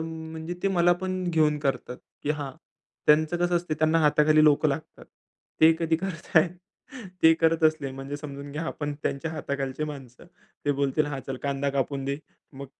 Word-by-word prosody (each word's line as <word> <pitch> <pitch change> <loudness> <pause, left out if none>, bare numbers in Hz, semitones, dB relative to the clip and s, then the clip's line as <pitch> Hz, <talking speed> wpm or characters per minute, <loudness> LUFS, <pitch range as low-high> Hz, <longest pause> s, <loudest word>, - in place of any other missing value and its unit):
म्हणजे 160 +1 -6
ते 195 - +2
मला 175 -2 +4
पण 185 0 -2
घेऊन 155 -2 +2
करतात. 135 -3 -2 0.3
की 145 - -1
हां, 145 -3 -3 0.5
त्यांचं 155 +2 +4
कसं 175 0 +1
असते, 170 -2 -2
त्यांना 155 +1 +2
हाताखाली 155 0 +4
लोकं 150 0 +4
लागतात. 140 +3 -5 0.6
ते 160 +1 +8
कधी 165 -1 +1
करताहेत 170 -2 +1 0.7
ते 160 0 +8
करत 165 0 +2
असले 155 -3 +2
म्हणजे 135 +2 -6
समजून 140 -1 -8
घ्या, 155 +2 -3
आपण 145 -2 -3
त्यांच्या 140 +4 -2
हाताखालची 140 -2 -3
माणसं. 135 -5 -9 0.4
ते 145 - +2
बोलतील, 140 +2 0
"हां, 135 -2 -4
चल 135 - -4
कांदा 140 0 -1
कापून 135 0 -2
दे," 140 0 -1 0.4
मग 140 +1 -8
150 Hz, 170 wpm, -26 LUFS, 140-160 Hz, 0.7 s, ते